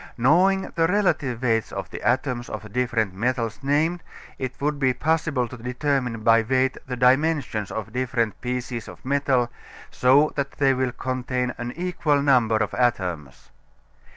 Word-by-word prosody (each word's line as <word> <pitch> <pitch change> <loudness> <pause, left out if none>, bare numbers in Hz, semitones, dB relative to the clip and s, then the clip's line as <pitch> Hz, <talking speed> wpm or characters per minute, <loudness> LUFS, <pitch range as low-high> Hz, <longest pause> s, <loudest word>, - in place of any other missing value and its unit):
Knowing 180 +10 +4
the 165 -1 +2
relative 155 - 0
weights 115 -3 +1
of - - -6
the - - -7
atoms 125 +1 0
of 110 0 -6
the 105 - -10
different 115 -3 0
metals 115 +2 -1
named, 155 +5 +1 0.4
it 130 -1 -5
would 145 0 -1
be 130 -3 +2
possible 150 -2 0
to 130 - -9
determine 125 -1 -2
by 115 0 +5
weight 130 +3 +1
the 125 - -3
dimensions 130 - +2
of 110 -3 -6
different 120 -3 -1
pieces 125 -1 -4
of - - -12
metal 130 -3 +1 0.4
so 140 +4 +4
that 140 -1 -2
they 135 -1 +3
will 130 -1 0
contain 125 0 -2
an 120 0 -4
equal 170 -4 0
number 125 -6 +3
of 105 -1 -1
atoms. 90 - -2
125 Hz, 155 wpm, -24 LUFS, 120-140 Hz, 0.4 s, by